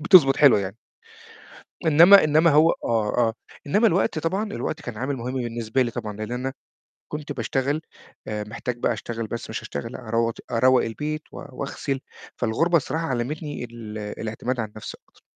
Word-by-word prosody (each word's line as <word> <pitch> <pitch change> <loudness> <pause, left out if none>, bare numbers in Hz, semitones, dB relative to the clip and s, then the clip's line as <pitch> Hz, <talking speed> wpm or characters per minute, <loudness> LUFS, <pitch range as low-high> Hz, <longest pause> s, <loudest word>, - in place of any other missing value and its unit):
بتضبط 155 -5 +7
حلوة 140 -8 +6
يعني. 100 +1 -5 1.1
إنما 170 +6 +8
إنما 155 +2 +4
هو 155 +3 +6
آه، 110 -2 +1
آه 115 -2 +2 0.3
إنما 210 +11 +3
الوقت 180 -4 +2
طبعًا، 185 +7 -1
الوقت 160 - -3
كان 120 -7 -7
عامل 130 +4 -2
مهم 125 +2 -4
بالنسبة 120 0 -1
لي 120 - -1
طبعًا 105 -2 -5
لإن 110 +2 -5
أنا 130 +2 -2 0.6
كنت 150 -1 -6
باشتغل 145 +2 -1 0.5
آآ، 105 -1 -3
محتاج 115 +3 -5
بقى 120 - +1
اشتغل 115 0 -5
بس 115 - -6
مش - - -4
اشتغل 115 - -6
أرود 115 -1 -1 0.2
أروّق 130 +2 +4
البيت 150 +7 -3
و - - -10
واغسل، 135 +1 -3 0.4
فالغُربة 165 +10 +2
الصراحة 160 +2 -2
علمتني 145 +4 -3
ال 115 -3 -8
الاعتماد 110 +4 -4
على 110 - -2
النفس 105 0 -8
أكتر. - - -27
125 Hz, 165 wpm, -24 LUFS, 115-150 Hz, 1.1 s, إنما